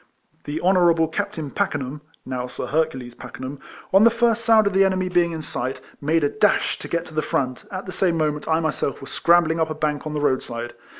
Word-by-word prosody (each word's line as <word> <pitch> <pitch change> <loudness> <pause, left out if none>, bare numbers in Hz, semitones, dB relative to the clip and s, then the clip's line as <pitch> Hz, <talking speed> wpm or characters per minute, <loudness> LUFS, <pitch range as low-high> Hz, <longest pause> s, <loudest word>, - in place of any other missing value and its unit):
The 150 +2 -3
honourable 175 -3 +4
Captain 165 -4 -4
Pakenham 145 +1 -2 0.2
(now 125 -1 -3
Sir 125 - -5
Hercules 145 -6 -1
Pa 125 - -10
kenham), 130 +3 -7 0.3
on 195 +2 +7
the 230 - +8
first 230 -1 +1
sound 225 -2 +5
of 200 - +1
the 195 +1 +5
enemy 185 -1 +1
being 175 -1 +2
in 160 -1 -5
sight, 130 -1 -4 0.2
made 155 +2 +1
a 145 - +3
dash 210 +2 +1
to - - -6
get 170 0 -2
to 160 - -13
the 155 - 0
front, 130 -3 -2
at 185 0 -5
the 185 - -6
same 180 -3 +1
moment 150 -1 -1
I 160 0 +2
myself 155 -3 -2
was 135 - -9
scrambling 170 -1 +3
up 160 -1 +1
a 155 - -3
bank 150 -1 -2
on 150 - -4
the - - 0
road 135 -3 +2
side. 120 0 -6
160 Hz, 230 wpm, -23 LUFS, 145-185 Hz, 0.3 s, the